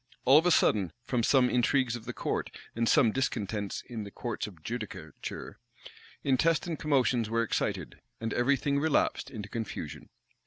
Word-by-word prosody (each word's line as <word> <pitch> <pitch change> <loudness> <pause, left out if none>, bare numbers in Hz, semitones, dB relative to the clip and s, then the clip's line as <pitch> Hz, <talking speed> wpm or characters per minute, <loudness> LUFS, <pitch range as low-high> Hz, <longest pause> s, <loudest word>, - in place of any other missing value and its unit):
All 135 +4 +8
of 170 - +1
a - - +5
sudden, 100 - +3
from 125 -1 0
some 125 +2 +4
intrigues 125 0 +2
of 115 -2 -8
the 125 - -4
court, - - -2 0.3
and 115 0 +1
some 125 -8 +5
discontents 105 -5 -2
in 115 -4 -5
the 100 - -7
courts 115 +2 -4
of 85 -7 -13
judicature, 110 - -6 0.6
intestine 160 +5 +2
commotions 130 -6 +1
were 115 +1 +1
excited, 115 - -2 0.2
and 115 -1 -3
every 130 +3 +3
thing 140 0 0
relapsed 155 0 +1
into 105 -4 -7
confusion. 110 -1 -6
120 Hz, 160 wpm, -30 LUFS, 110-135 Hz, 0.6 s, All